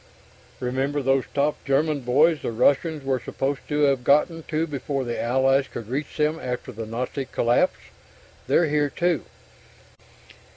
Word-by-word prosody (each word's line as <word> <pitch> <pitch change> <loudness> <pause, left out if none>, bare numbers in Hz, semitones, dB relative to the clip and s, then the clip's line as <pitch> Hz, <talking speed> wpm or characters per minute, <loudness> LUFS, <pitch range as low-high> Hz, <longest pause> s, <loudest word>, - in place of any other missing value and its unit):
Remember 135 +3 -1
those 135 0 +2
top 145 +1 0
German 145 +2 +1
boys 145 +6 +3
the - - -3
Russians 140 +6 +2
were 135 -1 0
supposed 135 +3 -2
to 150 0 0
have 140 -3 +3
gotten 150 +5 +3
to 155 +1 0
before 140 -2 -3
the 120 -1 -3
Allies 135 +3 +2
could 115 -2 -8
reach 140 +4 -4
them 155 +1 +1
after 125 -1 -4
the 115 -1 -7
Nazi 125 +4 -3
collapse? 120 -1 +1 0.7
_They're 170 - +4
here 145 -1 +1
too! 170 -1 0
140 Hz, 150 wpm, -24 LUFS, 125-150 Hz, 0.7 s, They're